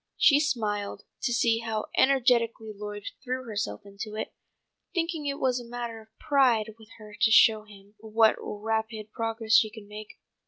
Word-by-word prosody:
She 290 -2 +6
smiled 210 -9 -2 0.2
to 250 - 0
see 230 -1 +2
how 225 -2 -3
energetically 235 -4 +2
Lloyd 205 0 -7 0.2
threw 255 0 -3
herself 215 -2 -4
into 200 +2 -8
it, 220 - -5 0.6
thinking 330 -3 -1
it 280 0 -2
was 255 -1 +1
a - - -8
matter 235 -2 -5
of 220 0 -23
pride 240 -6 +2
with 220 -1 -16
her 210 -1 -12
to 225 - +5
show 220 -1 +6
him 200 -1 -16
what 220 +1 +3
rapid 220 0 -3
progress 225 0 -2
she 220 - +6
could 215 -1 -12
make. 210 +1 -10
225 Hz, 165 wpm, -27 LUFS, 215-245 Hz, 0.6 s, She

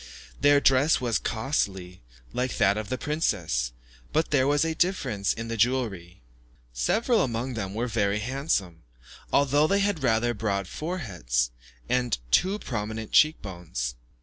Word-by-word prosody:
Their 145 0 +5
dress 140 +3 +4
was 120 -4 0
costly, 95 -7 -2 0.3
like 125 0 -2
that 100 -2 +4
of 110 -1 -4
the 130 - -1
princess, 90 - -1 0.4
but 160 +1 0
there 135 -2 +3
was 145 +2 +3
a 165 - 0
difference 135 - 0
in 115 0 -4
the 115 - -3
jewellery. 105 - -1 0.5
Several 225 - +2
among 120 +1 -2
them 100 -3 -4
were 115 +2 -1
very 100 -3 0
handsome, 105 - -2 0.5
although 145 +2 +3
they 200 - +2
had 200 -6 0
rather 120 -1 +2
broad 100 -3 -2
foreheads, 90 - -2 0.4
and 125 -3 +1
too 190 - +3
prominent 110 - -5
cheek 155 +1 +4
bones. 85 - -4
115 Hz, 145 wpm, -26 LUFS, 100-145 Hz, 0.5 s, Their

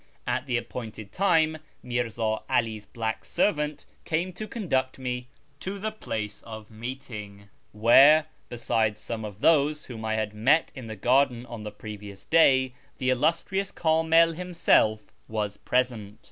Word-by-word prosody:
At 130 +2 -1
tlie 125 -2 +1
appointed 110 -4 -7
time 160 -5 +2 0.3
Mirz;i 120 -2 -2
'All's 110 -1 -1
black 110 -1 -3
servant 150 -6 0 0.2
came 170 +3 -1
to 215 +4 -6
conduct 135 - -1
me 125 -1 -4 0.3
to 195 +2 -5
the 215 +2 -3
place 105 - -5
of 110 -1 -10
meeting, 110 -4 -8 0.2
where, 135 +8 +6 0.2
besides 110 -3 0
some 110 +1 -5
of 105 -1 -8
those 150 -1 +3
whom 115 -3 -8
I 110 0 -1
had 110 -1 -2
met 135 +10 +3
in 130 -4 -8
the 110 - -6
garden 125 +3 +2
on 120 -3 -8
the 105 - -5
previous 105 -2 -9
day, 130 0 +4 0.2
the 130 -1 +1
illustrious 170 +8 0
Kamil 165 +1 +3
himself 165 -11 +1
was 105 -2 -3
present. 115 -5 -1
125 Hz, 145 wpm, -27 LUFS, 110-155 Hz, 0.3 s, where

